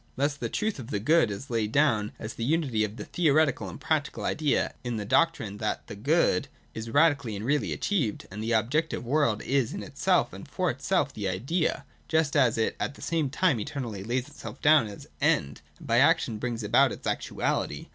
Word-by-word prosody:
235.] 140 - +1
Thus 140 - -10
the - - -2
truth 215 -6 -1
of 120 - -7
the 105 - -1
Good 155 +3 +3
is 105 +7 -6
laid 110 -2 0
down 115 -7 +2
as 110 +1 -6
the 115 - -5
unity 135 -5 +1
of 105 0 -3
the 105 - -6
theoretical 150 - +2
and 85 - -9
practical 155 -3 -1
idea 150 -2 0
in 120 -2 -3
the 105 - -4
doc 165 +9 +4
trine 105 -9 -7
that 105 - -2
the - - -8
Good 135 - +2 0.3
is 110 +1 -6
radically 140 -5 +3
and 100 +2 -5
really 145 +3 +1
achieved, 150 - -1
that 105 - -7
the 115 +2 -2
objective 120 +5 0
world 125 -5 +1
is 135 -4 0
in - - -5
itself 175 +5 +1
and 165 - -9
for 180 +3 0
itself 140 +3 0
the 100 -3 -2
Idea, 135 - -1 0.2
just 160 -2 +1
as 130 -6 +4
it 110 - 0
at 145 - -2
the - - -11
same 160 -4 0
time 150 -3 +2
eternally 110 -3 -5
lays 125 +4 -2
itself 130 -5 -10
down 150 -6 +5
as 100 - -10 0.2
End, 70 +1 +1 0.2
and - - -13
by - - +3
action 110 -2 +3
brings 120 -2 -3
about 105 - +4
its - - -8
actuality. 70 - -2
130 Hz, 210 wpm, -27 LUFS, 110-155 Hz, 0.3 s, down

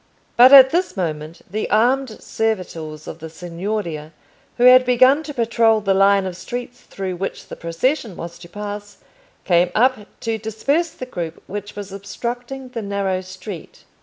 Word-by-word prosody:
But 250 +2 +8
at 265 -1 +10
this 355 - -1
moment 155 -2 -4
the 215 +4 -3
armed 245 +2 +1
servitors 170 -8 -3
of - - -7
the 160 0 -8
Signoria, 170 -1 -5 0.4
who 240 - +1
had 255 +1 +8
begun 255 +4 +4
to 310 - -7
patrol 230 -2 +3
the 195 -2 +1
line 195 0 +4
of 185 -2 -4
streets 245 +6 -7
through 190 -2 -5
which 195 +2 -5
the - - -7
procession 195 - -1
was 170 0 -8
to 170 -1 -13
pass, 205 +1 -7 0.5
came 175 -1 +3
up 240 -2 +2
to 225 -1 -2
disperse 275 +10 0
the 255 - -8
group 170 -9 -6
which 205 +1 -7
was 200 -1 -7
obstructing 245 +6 -6
the 240 -2 -5
narrow 200 -2 -1
street. 185 -1 -10
205 Hz, 165 wpm, -20 LUFS, 180-245 Hz, 0.5 s, at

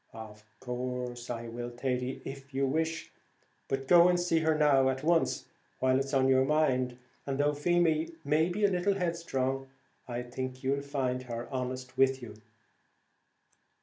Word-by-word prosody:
"Of 110 -2 -10 0.2
course 125 -1 -4
I 120 -1 -4
will, 120 +1 -5
Thady, 125 +1 -3
if 135 0 -8
you 135 0 +2
wish 160 +4 -1
it; - - -22 0.6
but 135 0 -2
go 175 +2 +7
and 175 0 +2
see 175 -2 +2
her 160 -1 +2
now 140 -3 +4
at 130 +1 -3
once, 165 +1 +2 0.3
while 130 0 +2
it's 135 0 -3
on 135 -2 +3
your 130 0 +5
mind, 130 -4 +1 0.3
and 135 -1 -1
though 145 +1 +2
Feemy 165 +1 +1
may 155 +4 +3
be 205 +4 +1
a 200 - +3
little 190 +2 +1
headstrong, 135 -7 -2 0.4
I 120 0 -3
think 130 +1 -6
you'll 140 +1 +1
find 135 -3 -2
her 120 +1 -4
honest 130 0 -4
with 135 0 +4
you." 120 -3 -9
135 Hz, 165 wpm, -30 LUFS, 125-155 Hz, 0.6 s, go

